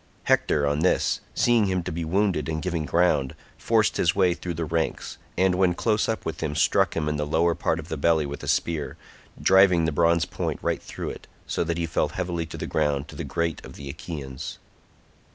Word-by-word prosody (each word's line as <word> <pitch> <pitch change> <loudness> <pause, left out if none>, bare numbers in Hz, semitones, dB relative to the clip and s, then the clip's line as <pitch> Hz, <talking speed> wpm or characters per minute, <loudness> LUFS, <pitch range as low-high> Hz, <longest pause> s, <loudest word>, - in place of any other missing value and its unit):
Hector 75 -1 +2
on 70 +1 +1
this, 90 +3 +2 0.2
seeing 120 -4 +3
him 95 -2 0
to - - -4
be 85 +1 -3
wounded 85 -3 0
and 80 0 -1
giving 85 -3 -2
ground, 75 -6 +2 0.2
forced 110 -2 +1
his 85 - +2
way 95 -3 +3
through 85 0 -5
the 80 0 -2
ranks, 80 +1 -2 0.2
and 95 +1 +3
when 90 -1 +2
close 110 +2 +1
up 110 - -2
with 80 0 -4
him 75 -2 -2
struck - - +2
him 75 -2 0
in 75 0 -1
the 75 0 -2
lower 85 +3 +2
part 80 0 0
of 80 -2 -7
the 80 - -4
belly 80 +1 +2
with 70 +1 -6
a - - -7
spear, 80 -3 -1 0.4
driving 95 -3 +5
the 80 - +1
bronze 85 +2 +3
point - - -3
right - - 0
through - - -6
it, - - -11 0.2
so - - -1
that 85 0 -1
he 85 - 0
fell 80 - 0
heavily 85 -3 -3
to - - -8
the - - -4
ground 70 0 0
to - - -10
the - - -4
great 85 -1 -2
grief - - -11
of - - -13
the 70 -1 -8
Achaeans. 70 -4 -7
85 Hz, 225 wpm, -25 LUFS, 75-90 Hz, 0.4 s, driving